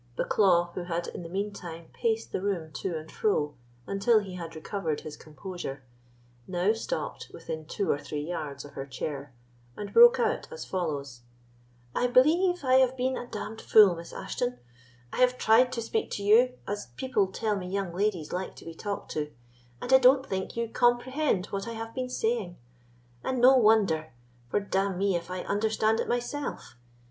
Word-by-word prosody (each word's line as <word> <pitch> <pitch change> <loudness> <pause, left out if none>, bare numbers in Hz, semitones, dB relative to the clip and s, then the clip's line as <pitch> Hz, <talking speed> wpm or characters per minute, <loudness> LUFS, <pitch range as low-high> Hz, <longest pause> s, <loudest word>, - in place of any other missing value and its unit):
Bucklaw, 175 -4 +3
who 180 - -5
had 170 0 -2
in - - -7
the 165 - -8
mean 200 +3 -2
time 165 -3 -9
paced 225 -1 -1
the - - -2
room 180 -6 -2
to 170 +2 -3
and 155 +1 -9
fro, 150 -9 0 0.3
until 200 - +3
he 200 -3 -2
had 170 -2 -7
recovered 160 -1 -3
his 155 - -8
composure, 150 -3 -7 0.6
now 185 +3 +2
stopped 230 - -4
within 155 -1 -7
two 195 +3 -1
or 140 - 0
three 145 0 -5
yards 145 -5 -5
of 145 - -11
her 135 0 -6
chair, 140 +1 -5 0.5
and 205 -1 -6
broke 480 +1 +8
out 465 0 0
as 480 - -7
follows: 145 -9 -3 0.7
"I 245 - +1
believe 320 +8 +4
I 260 -1 +5
have 260 0 +3
been 255 +1 0
a 245 - -5
d—d 220 -1 -6
fool, 205 -5 +7
Miss 170 0 -9
Ashton; 125 0 -3 0.6
I - - -4
have 250 0 +4
tried 245 +3 +5
to 230 -2 -2
speak 440 - -1
to 200 - -4
you 235 +5 +5
as 205 -10 -4
people 225 - +1
tell 210 +2 -1
me 185 -2 -4
young 195 -2 -2
ladies 185 -4 -1
like 185 +1 -3
to - - -13
be 165 - -7
talked 200 +4 -5
to, 150 -1 -2 0.5
and 260 - 0
I 265 - +9
don't 260 +1 +5
think 190 0 -4
you 235 0 0
comprehend 240 -2 +1
what 195 +2 -3
I 230 - -4
have 225 0 -6
been 255 -1 -3
saying; 225 -7 -1 0.7
and 260 -1 -1
no 255 +2 +7
wonder, 205 - +3 0.4
for - - +2
d—n 195 -1 -1
me 195 0 +1
if 170 +1 -4
I 180 0 -4
understand 220 +2 +1
it - - -1
myself! 245 - -3
200 Hz, 185 wpm, -28 LUFS, 170-240 Hz, 0.7 s, I